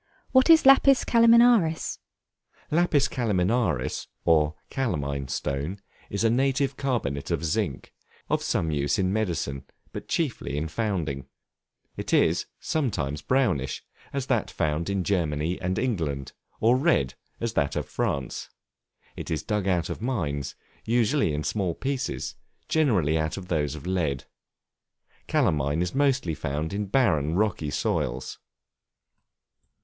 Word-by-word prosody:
What 260 +2 +5
is 320 -3 +7
Lapis 275 0 +6
Calaminaris? 230 -7 +4 0.7
Lapis 155 -4 +3
Calaminaris, 105 - 0 0.2
or 80 -2 +3 0.2
calamine 70 - -2
stone, 70 +7 -3 0.3
is 100 +2 -2
a 115 - +4
native 135 +3 +1
carbonate 115 - -2
of 85 - -1
zinc, 75 - -2 0.3
of - - 0
some 80 - 0
use 70 -1 0
in 95 0 +1
medicine, 85 -10 -2 0.3
but - - -7
chiefly 135 - -2
in 80 +2 -1
founding. 80 - -2 0.7
It - - -4
is, - - +2
sometimes 80 - -2
brownish, 90 - 0 0.3
as 140 -2 -2
that - - 0
found 80 +4 -1
in 100 -2 0
Germany 85 -3 -1
and 90 0 -1
England, 80 - -2 0.3
or 120 +3 +4
red, 130 - +2 0.3
as 115 -1 -2
that 70 -2 0
of - - -2
France. 70 -2 -3 0.7
It - - -7
is 80 -3 -2
dug 105 -2 -1
out 90 -3 +1
of - - -6
mines, 80 - -2 0.3
usually 120 - +2
in 75 +1 -2
small 90 +1 -1
pieces; 135 -1 -3 0.3
generally 95 - +2
out 80 +3 -2
of 90 -2 -8
those 75 -3 0
of 75 - -9
lead. 80 -8 -1 1.0
Calamine 80 - +1
is 90 - -3
mostly 135 - +1
found 75 +3 -3
in 100 0 -2
barren, 85 - +2
rocky 95 -7 0
soils. 65 -2 -2
90 Hz, 130 wpm, -26 LUFS, -, 1.0 s, is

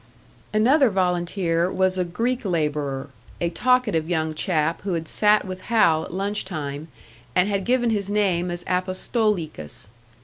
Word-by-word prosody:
Another 255 +6 +4
volunteer 180 -2 0
was 185 -1 +1
a 185 - +1
Greek 230 +9 -2
labourer, 150 -6 -1 0.3
a 170 -1 -1
talkative 210 -6 +1
young 160 -2 0
chap 155 0 0
who 190 -1 -2
had 165 -1 -4
sat 210 +3 +3
with 185 -1 -6
Hal 165 -9 +3
at - - -10
lunch 200 +3 -2
time, 150 -4 -5 0.5
and 180 - +4
had 200 -2 -1
given 240 -2 +2
his 200 -2 -1
name 190 -4 +1
as 175 0 -4
Apostolikas. 185 - -2
185 Hz, 145 wpm, -23 LUFS, 165-210 Hz, 0.5 s, Another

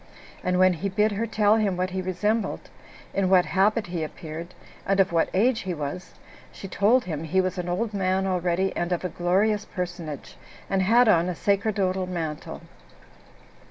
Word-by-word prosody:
And 180 0 +1
when 185 0 +5
he 180 +4 -3
bid 210 +3 +2
her 220 +3 -2
tell 215 0 +3
him 200 -4 0
what 185 0 -1
he 190 0 -2
resembled, 205 +4 -2 0.4
in 195 -2 +1
what 185 -2 +5
habit 210 +3 +2
he 175 -3 -4
appeared, 160 +2 -8 0.3
and 195 0 0
of 195 -1 +4
what 165 -1 +2
age 225 +5 +2
he 185 -2 -4
was, 150 +4 -6 0.4
she 195 - -9
told 210 +7 +2
him 160 -3 -4
he 175 +4 0
was 185 0 -1
an 175 0 -3
old 210 +5 -1
man 190 -1 0
already, 185 0 0
and 175 +1 -2
of 175 +1 -1
a - - -1
glorious 195 +5 +1
personage, 175 -7 -6 0.3
and 195 -1 +2
had 230 +6 +4
on 175 -4 +4
a 180 - -3
sacerdotal 195 -1 0
mantle. 165 -4 -5
185 Hz, 180 wpm, -25 LUFS, 175-205 Hz, 0.4 s, when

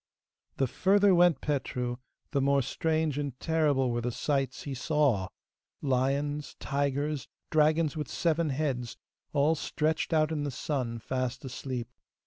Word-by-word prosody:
The 135 - +3
further 195 +8 +4
went 175 -2 +5
Petru, 125 -4 -2 0.3
the 140 -3 +1
more 140 0 +3
strange 160 0 0
and 140 -3 -4
terrible 150 -6 +2
were 120 0 -1
the 120 +1 -1
sights 135 0 -1
he 140 - -4
saw 130 - +1 0.5
lions, 140 +2 0
tigers, 140 0 -1 0.2
dragons 155 0 +3
with 150 -1 -3
seven 165 -1 +1
heads, 130 -4 -2 0.3
all 145 +2 +3
stretched 155 +1 -1
out 155 -1 +3
in 155 -2 -1
the 145 - -1
sun 125 -3 -2
fast 130 +2 -3
asleep. 125 -2 -4
145 Hz, 135 wpm, -29 LUFS, 130-155 Hz, 0.5 s, went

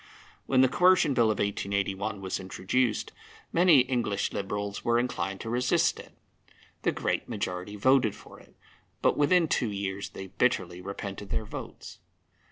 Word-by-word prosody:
When 130 -1 +4
the 130 - +6
Coercion 175 0 +4
Bill 120 -2 +3
of 110 - 0
1881 100 0 -2
was 95 -1 -3
introduced, 100 +5 -1 0.4
many 170 -5 +6
English 120 -6 -1
Liberals 100 0 -4
were 120 0 +2
inclined 95 -6 -2
to 115 - -5
resist 125 +1 +2
it. - - -12 0.7
The - - +1
great - - -2
majority 100 -3 -4
voted 125 0 +3
for - - -14
it, - - -20 0.5
but - - +4
within 165 +3 +3
two 120 -6 0
years 100 -1 -4
they 95 - -8
bitterly 90 -4 0
repented 100 +1 -6
their 110 - -2
votes. - - -9
105 Hz, 150 wpm, -28 LUFS, 100-125 Hz, 0.7 s, the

